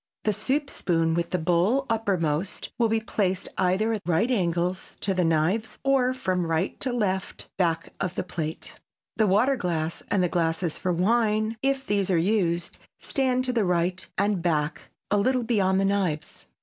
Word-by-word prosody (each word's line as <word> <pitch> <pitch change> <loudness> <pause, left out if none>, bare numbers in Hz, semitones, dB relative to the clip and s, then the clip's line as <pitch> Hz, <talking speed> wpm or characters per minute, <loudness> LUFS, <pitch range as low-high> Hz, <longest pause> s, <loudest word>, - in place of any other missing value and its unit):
The 215 - +2
soup 275 +7 -1
spoon 165 -2 +1
with 170 0 -1
the 180 - 0
bowl 180 +11 +2
uppermost 185 -6 -1
will 230 -1 +3
be 225 0 +2
placed 190 -4 -1
either 190 +5 +1
at 215 - -3
right 180 +9 +1
angles 180 -3 -1
to 195 - 0
the 180 -1 +1
knives 165 +7 +1
or 270 -2 +3
from 185 -8 -1
right 165 +3 -1
to 260 - -1
left 195 -6 -2
back 165 -2 0
of 180 -2 -2
the - - -1
plate. 160 -3 -5 0.4
The 220 - +3
water 225 +8 +3
glass 170 -7 -2
and 190 - +2
the - - +3
glasses 165 -1 0
for 185 - 0
wine, 215 +4 +1
if 270 0 0
these 200 -4 0
are 180 - +3
used, 175 -2 0 0.2
stand 255 -2 0
to 250 - -1
the 230 -3 +2
right 180 0 0
and 200 -2 +1
back, 155 -2 -1 0.2
a 205 - +4
little 250 +4 +2
beyond 195 -5 +2
the 195 - +2
knives. 185 -7 -2
190 Hz, 175 wpm, -26 LUFS, 170-225 Hz, 0.4 s, a